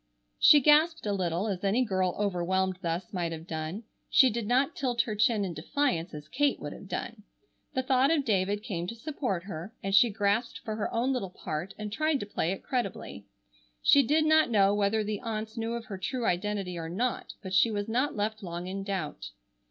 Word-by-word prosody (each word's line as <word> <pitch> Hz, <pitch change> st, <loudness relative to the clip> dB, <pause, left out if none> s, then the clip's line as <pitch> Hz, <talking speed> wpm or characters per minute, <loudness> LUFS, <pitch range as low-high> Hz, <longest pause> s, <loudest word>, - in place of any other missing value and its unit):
She 295 Hz, -, +8 dB
gasped 310 Hz, +2 st, +4 dB
a 205 Hz, -, 0 dB
little, 180 Hz, +1 st, -1 dB
as 195 Hz, -3 st, -3 dB
any 220 Hz, +6 st, +2 dB
girl 185 Hz, -4 st, 0 dB
overwhelmed 190 Hz, -1 st, 0 dB
thus 175 Hz, +1 st, -3 dB
might 175 Hz, -3 st, -1 dB
have 160 Hz, 0 st, -7 dB
done. 160 Hz, +5 st, -5 dB, 0.3 s
She 260 Hz, -2 st, +6 dB
did 225 Hz, -1 st, -3 dB
not 255 Hz, +4 st, +2 dB
tilt 245 Hz, -4 st, +1 dB
her 220 Hz, -, -4 dB
chin 215 Hz, -1 st, +2 dB
in 180 Hz, -, -4 dB
defiance 175 Hz, -, -1 dB
as 150 Hz, 0 st, -9 dB
Kate 285 Hz, -, +1 dB
would 145 Hz, -, -6 dB
have 195 Hz, -, -11 dB
done. 220 Hz, +3 st, -5 dB, 0.5 s
The 260 Hz, -, +1 dB
thought 260 Hz, +1 st, +3 dB
of 300 Hz, -4 st, +2 dB
David 205 Hz, -1 st, 0 dB
came 175 Hz, -4 st, -3 dB
to 230 Hz, -, -5 dB
support 245 Hz, -, -3 dB
her, 190 Hz, +2 st, -7 dB
and 195 Hz, 0 st, -2 dB
she 220 Hz, +4 st, +6 dB
grasped 205 Hz, +3 st, 0 dB
for 215 Hz, -2 st, -3 dB
her 215 Hz, -, -2 dB
own 250 Hz, +4 st, +1 dB
little 200 Hz, -7 st, -2 dB
part 175 Hz, 0 st, -5 dB
and 210 Hz, -1 st, -5 dB
tried 310 Hz, +2 st, +1 dB
to -, -, -4 dB
play 185 Hz, -4 st, -1 dB
it 195 Hz, -, -5 dB
creditably. 195 Hz, -, -4 dB, 0.6 s
She 285 Hz, -, +7 dB
did 305 Hz, +4 st, +2 dB
not 315 Hz, -2 st, +4 dB
know 200 Hz, -3 st, +4 dB
whether 205 Hz, +1 st, +1 dB
the 210 Hz, -1 st, -3 dB
aunts 220 Hz, -2 st, -4 dB
knew 225 Hz, 0 st, -2 dB
of 235 Hz, -1 st, -4 dB
her 195 Hz, -3 st, -7 dB
true 245 Hz, +5 st, -2 dB
identity 185 Hz, -1 st, -1 dB
or 165 Hz, 0 st, -5 dB
not, 235 Hz, +8 st, -2 dB
but 190 Hz, -1 st, -6 dB
she 200 Hz, +5 st, +5 dB
was 205 Hz, -1 st, -2 dB
not 250 Hz, +6 st, 0 dB
left 215 Hz, +1 st, -2 dB
long 175 Hz, -2 st, -5 dB
in 195 Hz, +1 st, -4 dB
doubt. 190 Hz, -7 st, -4 dB
205 Hz, 210 wpm, -29 LUFS, 185-240 Hz, 0.6 s, She